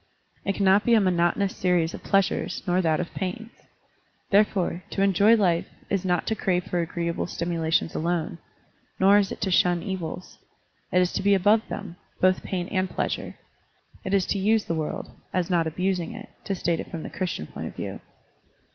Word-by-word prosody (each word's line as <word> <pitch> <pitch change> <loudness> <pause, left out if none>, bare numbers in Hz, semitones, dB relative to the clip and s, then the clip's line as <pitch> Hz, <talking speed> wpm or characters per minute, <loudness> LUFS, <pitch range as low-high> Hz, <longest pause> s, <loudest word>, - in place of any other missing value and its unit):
It 195 - 0
cannot 195 +1 +4
be 235 - +4
a - - +6
monotonous 185 +1 +1
series 175 -3 +1
of - - -7
pleasures, 190 -2 0
nor 180 0 +2
that 160 -3 +1
of 175 - -4
pains. 200 +5 -4 0.8
Therefore, 195 -3 +2
to 195 - 0
enjoy 200 +3 +5
life 180 -6 +2 0.2
is 195 -1 +1
not 180 -2 0
to 220 - 0
crave 180 -3 0
for 175 - -2
agreeable 170 0 -2
stimulations 165 -2 -1
alone, 170 0 -2 0.6
nor 200 +2 +6
is 195 -2 0
it - - -6
to 195 - 0
shun 175 -1 +3
evils. 185 -3 -5 0.5
It 180 0 +4
is 180 - -2
to - - -1
be 200 +1 +4
above 205 +4 +4
them, 195 -4 -6 0.2
both 185 0 +3
pain 180 -2 -3
and 185 -2 0
pleasure. - - -3 0.7
It 190 +1 0
is 190 -2 +2
to 200 - -2
use 215 +2 +2
the - - -2
world, 155 -2 -4 0.2
as 180 0 0
not 170 -2 +2
abusing 180 +1 -1
it, - - -9 0.2
to 195 - -1
state 170 -2 0
it - - -6
from 165 - -6
the - - -7
Christian 180 - -3
point - - -7
of - - -9
view. - - -5
185 Hz, 190 wpm, -25 LUFS, 170-195 Hz, 0.8 s, a